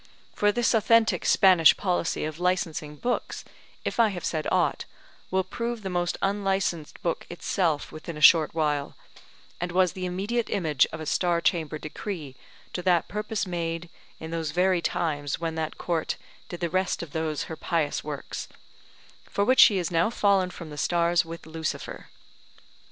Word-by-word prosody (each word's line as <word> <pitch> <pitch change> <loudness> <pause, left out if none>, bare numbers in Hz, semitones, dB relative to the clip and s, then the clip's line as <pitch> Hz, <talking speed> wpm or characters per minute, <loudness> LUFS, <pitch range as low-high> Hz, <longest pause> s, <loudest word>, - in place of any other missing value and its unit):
For 205 0 +3
this 240 +3 +1
authentic 230 0 +3
Spanish 185 -5 +6
policy 180 -5 -1
of 155 +1 -5
licensing 170 -4 -1
books, 245 +11 -3 0.4
if - - -3
I 230 - +6
have 190 -4 -5
said 155 -2 -1
aught, - - +1 0.4
will 190 0 +1
prove 235 +2 -4
the 190 - -3
most 175 0 -1
unlicensed 195 -5 -1
book 170 - -2
itself 170 -3 -1
within 155 +1 -7
a - - -6
short 160 0 +6
while; 150 -3 -1 0.6
and 175 0 -3
was 180 0 +3
the 185 -1 -4
immediate 205 +6 -2
image 155 -10 +2
of 160 - -6
a - - -5
Star 175 +2 +1
Chamber 155 -1 0
decree 155 -2 -6 0.4
to 180 - -2
that 175 -2 +2
purpose 210 0 -2
made 170 -1 -3 0.3
in 160 0 -7
those 165 -2 -2
very 180 +2 +2
times 145 -4 -1
when 165 -1 -2
that 160 -1 -3
Court 165 -3 -2 0.3
did 175 - -7
the 170 - 0
rest 185 -1 0
of 160 - -9
those 160 -2 -2
her 160 - -6
pious 155 -2 -1
works, 145 -2 -6 0.8
for 200 - 0
which 255 +4 +3
she 205 - +8
is 175 -3 -2
now 165 +4 +3
fallen 200 -5 +2
from 170 -3 -9
the 150 - -7
stars 170 +1 +2
with 165 0 -9
Lucifer. 160 -1 -5
170 Hz, 170 wpm, -26 LUFS, 160-190 Hz, 0.8 s, she